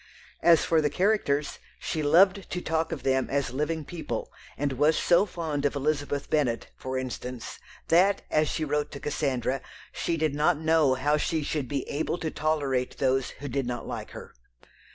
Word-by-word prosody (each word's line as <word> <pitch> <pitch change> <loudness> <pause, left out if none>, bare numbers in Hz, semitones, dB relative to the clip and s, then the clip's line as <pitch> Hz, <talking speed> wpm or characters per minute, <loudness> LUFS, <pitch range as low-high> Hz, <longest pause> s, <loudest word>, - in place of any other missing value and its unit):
As 165 -1 +5
for 160 -1 +3
the 150 - +1
characters, 150 -5 +1 0.2
she 155 - -3
loved 190 +6 +4
to 180 - -2
talk 160 -1 -1
of 165 - -4
them 130 -1 +1
as 140 -3 0
living 150 +3 -2
people, 170 0 -5 0.2
and 140 -1 -1
was 150 +4 +3
so 180 +4 +4
fond 160 -6 -3
of 145 0 +1
Elizabeth 145 0 -1
Bennet, 135 -7 0
for 130 0 -4
instance, 125 -1 -5 0.3
that, 190 +4 +4
as 155 0 +3
she 160 - -1
wrote 150 0 -1
to 140 - -6
Cassandra, 135 -3 -1 0.3
she 165 - -2
did 155 -2 0
not 150 +3 +2
know 160 -4 +3
how 145 +3 +2
she 155 +1 -1
should 145 -2 -2
be 140 +1 -3
"able 155 +3 -2
to 160 -2 -3
tolerate" 145 -5 -1
those 135 -1 +1
who 145 - -8
did 135 -1 -2
not 120 0 -4
like - - -5
her. - - -10
150 Hz, 180 wpm, -27 LUFS, 135-160 Hz, 0.3 s, As